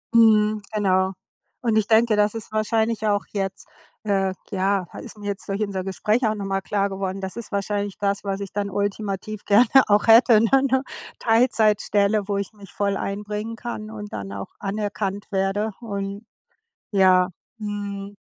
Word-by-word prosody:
Mhm, 215 -2 +5
genau. 190 -2 +2 0.5
Und 230 -3 +1
ich 210 -1 +2
denke, 225 -1 +4
das 210 +1 +2
ist 225 - -7
wahrscheinlich 220 0 0
auch 205 -1 +1
jetzt 195 -2 -4 0.4
äh, 195 -2 +1 0.2
ja, 195 -1 +1 0.2
ist - - -10
mir 205 - -10
jetzt 200 -1 -4
durch 200 +2 -2
unser 195 -3 -2
Gespräch 215 +5 +1
auch 215 - 0
nochmal 195 -1 -2
klar 200 0 0
geworden, 195 0 -4
das 190 0 -5
ist 235 - -7
wahrscheinlich 200 0 -2
das, 200 0 -1
was 195 0 -2
ich 195 - -6
dann 200 0 -2
ultimativ 205 +1 -3
gerne 210 +5 +6 0.2
auch 205 +2 +3
hätte, 225 -1 +7
ne? 230 - +2 0.2
'Ne 265 0 +3 0.4
Teilzeitstelle, 215 -3 +2
wo 200 - -1
ich 200 - -3
mich 200 -2 -14
voll 200 -1 0
einbringen 210 +3 -4
kann 220 -3 -6
und 210 -1 -8
dann 100 -1 -5
auch 100 -1 -6
anerkannt 205 0 -3
werde 195 +3 0
und 200 -1 -5 0.7
ja, 185 -2 +5 0.3
mhm. 205 -1 -5
205 Hz, 165 wpm, -23 LUFS, 195-215 Hz, 0.7 s, hätte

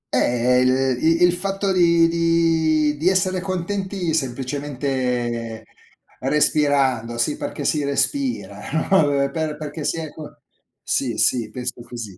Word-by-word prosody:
Eh, 125 +1 +2
il 130 0 +2
i 165 +2 +3
il 175 0 +5
fatto 195 +2 -1
di 170 -2 +4
di 165 -2 +1
di 165 +5 +2
essere 185 -1 +1
contenti 185 -1 -3
semplicemente 130 -4 -3 0.5
respirando, 135 -4 +1
sì 145 +5 0
perché - - -5
si 150 -2 +1
respira, 255 - -1
no, 160 - -1
per 145 -7 +3
per 155 -1 -3
perché 150 0 -6
si 165 - -1
è 160 -2 -5
co 155 -2 -12 0.4
sì - - -1
sì, 120 -3 +2
penso 125 -1 -4
così. 115 -6 -8
150 Hz, 135 wpm, -21 LUFS, 130-170 Hz, 0.5 s, il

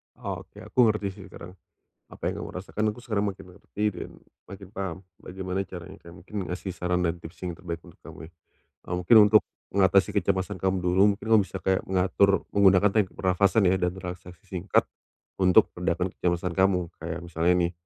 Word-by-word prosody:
Oke - - -7
aku 125 -2 +3
ngerti 105 -2 0
sih 95 0 -12
sekarang, 90 0 -11 0.6
apa - - -14
yang - - -5
kamu - - -8
rasakan 95 +3 -4
aku 120 - -13
sekarang 105 -4 -1
makin - - -14
ngerti 105 +1 -6
dan - - -7 0.4
makin 100 -1 -11
paham 95 -5 -5 0.2
bagaimana 95 +1 -4
caranya 95 +1 -10
kayak 85 - -14
mungkin 105 +4 -13
ngasih 90 +2 -4
saran 90 0 -1
dan 85 0 0
tips 80 -1 -12
yang 90 -2 -4
terbaik 85 -2 -6
untuk - - -16
kamu 80 - -10
ya, - - -29 0.6
eee. 90 - -2
Mungkin 90 +6 +4
untuk, 110 0 +6 0.3
mengatasi 95 0 +3
kecemasan 95 -1 -1
kamu 95 -1 0
dulu 90 +2 +3
mungkin 100 - -12
kamu 110 - +7
bisa - - -7
kayak 95 0 +1
mengatur 95 0 +2
menggunakan 100 0 +5
teknik 105 -3 +2
pernafasan 100 +3 +2
ya 95 - 0
dan 90 +1 -1
relaksasi 90 -1 -9
singkat, 95 0 0 0.6
untuk 95 +3 +5
meredakan 90 +1 -1
kecemasan 90 0 -1
kamu. 90 -2 +1
Kayak 85 +1 -5
misalnya 85 +1 +1
nih, 85 -1 +1
95 Hz, 185 wpm, -26 LUFS, 90-100 Hz, 0.6 s, kamu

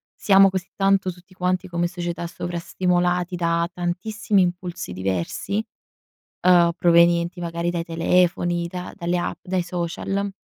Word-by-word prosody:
siamo 195 -1 +5
così 185 -1 -4
tanto, 195 -1 +2
tutti 180 +2 -18
quanti 185 0 -1
come 175 0 -1
società 175 -1 -4
sovrastimolati 180 +1 -1
da 170 -1 +1
tantissimi 190 +3 0
impulsi 175 - -4
diversi, 95 - -2 0.8
uhm, 175 -2 +6
provenienti 170 0 +4
magari 170 0 -2
dai 170 -1 -3
telefoni 175 +1 +1
da 180 0 -6
dalle 175 -1 -1
app, - - -3
dai 185 -1 0
social 180 +3 -3
175 Hz, 125 wpm, -23 LUFS, 170-185 Hz, 0.8 s, uhm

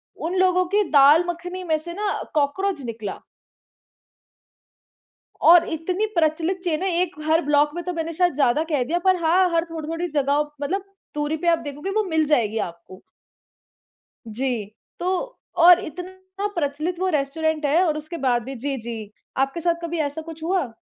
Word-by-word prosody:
उन 345 +4 -4
लोगों 365 -1 +3
की 420 - +4
दाल 295 +4 +7
मखनी 355 +2 -5
में 315 -3 +1
से 340 +2 -7
ना 410 +1 -1 0.2
कॉकरोच 310 +3 0
निकला। 220 -4 -6 2.3
और 345 0 +7
इतनी 355 +6 -1
प्रचलित 330 +3 +1
चेन 335 -1 -1
है 385 - +1
एक 365 0 -2
हर 320 +2 +3
ब्लॉक 295 0 +3
में 345 - -4
तो 360 - -3
मैंने 330 0 -3
शायद 355 0 +2
ज़्यादा 285 +1 +2
कह 275 -4 +2
दिया 335 +7 -1
पर 375 0 +5
हाँ, 360 +3 +4
हर 335 0 +1
थोड़ी-थोड़ी 330 +2 -3
जगहों 290 -1 +1 0.2
मतलब 375 +7 -1 0.3
दूरी 295 +1 -1
पे 345 - -4
आप 335 -1 +4
देखोगे 295 +6 -6
वो 430 +1 +1
मिल 320 -4 +1
जाएगी 230 -7 +1
आपको। 170 +3 -15 1.3
जी, 235 -1 -2 0.3
तो 375 +8 -2 0.2
और 350 +1 +8
इतना 375 +4 -6
प्रचलित 310 +3 -2
वो 375 - 0
रेस्टोरेंट 305 +1 -1
है 310 +5 +3
और 310 -3 +1
उसके 310 +3 -7
बाद 245 -4 +1
भी 270 +2 -7
जी, 270 +3 -3
जी, 225 -3 -7 0.3
आपके 270 +5 0
साथ 340 0 +2
कभी 335 0 -3
ऐसा 295 +1 -2
कुछ 320 0 -10
हुआ? 330 -9 -1
320 Hz, 170 wpm, -23 LUFS, 285-355 Hz, 2.3 s, और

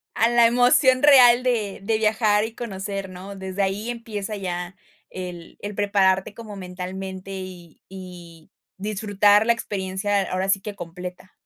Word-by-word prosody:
a - - 0
a - - +1
la 240 -1 +5
emoción 250 +2 +4
real 250 -4 +7
de 215 -6 -1
de 220 +2 +1
viajar 215 -1 +2
y 225 0 -8
conocer, 195 -3 -5
¿no?, 185 +2 -9
desde 190 0 -4
ahí 195 +4 -1
empieza 220 -3 -5
ya, 180 -1 -5 0.3
el 180 -2 -8
el 205 0 -6
prepararte 195 -1 +2
como 215 -2 -9
mentalmente 190 +1 -7
y 180 -3 -10
y 175 -4 -11 0.3
disfrutar 205 +1 +2
la 235 - +4
experiencia, 200 -2 -2
ahora 185 +1 -1
sí 195 0 +2
que 210 0 -6
completa. 180 +1 -9
195 Hz, 150 wpm, -23 LUFS, 185-220 Hz, 0.3 s, real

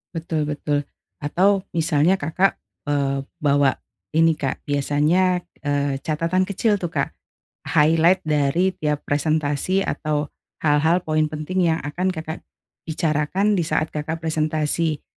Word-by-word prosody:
Betul 160 -2 -2
betul 145 -1 -1 0.3
atau 190 +6 +2
misalnya 165 +1 +3
Kakak, 180 +6 +1 0.2
eee, 140 -2 0 0.2
bawa 140 -2 +3 0.4
ini 160 0 +4
,Kak, 135 -2 -3
biasanya 150 +6 +1 0.2
eee 145 -1 0
catatan 165 +4 +1
kecil 205 +2 +1
tuh, 175 -4 -5
Kak, - - 0 0.6
highlight 165 +4 +4
dari 155 +4 +1
tiap 150 -1 -1
presentasi 155 +5 +1
atau 150 -4 -2 0.3
hal-hal, 160 +4 +3
poin 155 -2 +1
penting 155 +4 -1
yang 160 - -2
akan 180 +6 -2
Kakak 160 -1 -6 0.4
bicarakan 160 +6 0
disaat 160 -2 0
Kakak 155 +2 -4
presentasi. 155 0 0
155 Hz, 120 wpm, -22 LUFS, 145-175 Hz, 0.6 s, ini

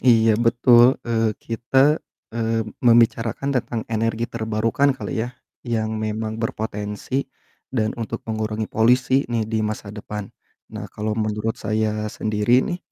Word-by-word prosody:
Iya 115 -3 +5
betul. 120 +1 +5
Eee, 115 -2 0
kita, 135 +6 +2 0.3
eee, 115 -1 0 0.2
membicarakan 120 +2 +3
tentang 115 0 -4
energi 115 +1 0
terbarukan 115 +4 0
kali 110 - -3
ya 115 - -2 0.4
yang 110 -1 -1
memang 110 +1 -3
berpotensi 110 +4 -3 0.4
dan 110 -4 0
untuk 115 +1 -4
mengurangi 110 -1 -2
polisi 125 +4 +3
nih 115 -2 0
di 110 0 -1
masa 105 -1 -3
depan. 105 -1 -6 0.5
Nah - - -6
kalau 105 +1 -3
menurut 110 0 -2
saya 110 0 -1
sendiri 110 +5 +2
nih, 175 - -3
110 Hz, 130 wpm, -22 LUFS, 110-120 Hz, 0.5 s, Iya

